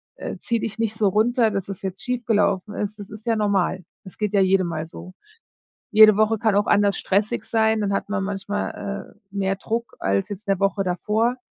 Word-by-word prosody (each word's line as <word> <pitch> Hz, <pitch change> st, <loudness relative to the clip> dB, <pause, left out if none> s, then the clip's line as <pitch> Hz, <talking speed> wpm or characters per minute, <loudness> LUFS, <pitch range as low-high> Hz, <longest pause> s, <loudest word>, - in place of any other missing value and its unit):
äh, -, -, -6 dB
zieh 235 Hz, -1 st, -1 dB
dich 215 Hz, 0 st, -4 dB
nicht 220 Hz, -1 st, -1 dB
so 215 Hz, -1 st, +2 dB
runter, 225 Hz, +3 st, +2 dB
dass 195 Hz, -2 st, -3 dB
es 195 Hz, -, -6 dB
jetzt 190 Hz, 0 st, -5 dB
schief 250 Hz, -1 st, -2 dB
gelaufen 205 Hz, -2 st, +1 dB
ist. 210 Hz, +1 st, -4 dB
Das 200 Hz, -, -9 dB
ist 215 Hz, 0 st, -11 dB
ja 230 Hz, -1 st, +2 dB
normal, 195 Hz, -3 st, 0 dB, 0.2 s
es 190 Hz, -, -12 dB
geht 210 Hz, -1 st, -2 dB
ja 200 Hz, -, +4 dB
jedem 190 Hz, -1 st, +3 dB
mal 155 Hz, -1 st, -3 dB
so. 180 Hz, +2 st, -11 dB, 0.8 s
Jede 215 Hz, -1 st, +8 dB
Woche 215 Hz, +1 st, +2 dB
kann 220 Hz, -1 st, +2 dB
auch 205 Hz, -, +2 dB
anders 200 Hz, -1 st, +3 dB
stressig 210 Hz, +5 st, 0 dB
sein. 220 Hz, -1 st, +2 dB
Dann 200 Hz, -1 st, 0 dB
hat 195 Hz, -, -2 dB
man 205 Hz, -2 st, -1 dB
manchmal, 200 Hz, 0 st, -4 dB
äh, -, -, -32 dB, 0.2 s
mehr 195 Hz, 0 st, 0 dB
Druck 230 Hz, +4 st, -4 dB
als 100 Hz, 0 st, 0 dB
jetzt 205 Hz, +1 st, -8 dB
'ne 195 Hz, -1 st, +2 dB
Woche 200 Hz, 0 st, +1 dB
davor. 215 Hz, +7 st, 0 dB
205 Hz, 215 wpm, -23 LUFS, 195-220 Hz, 0.8 s, Jede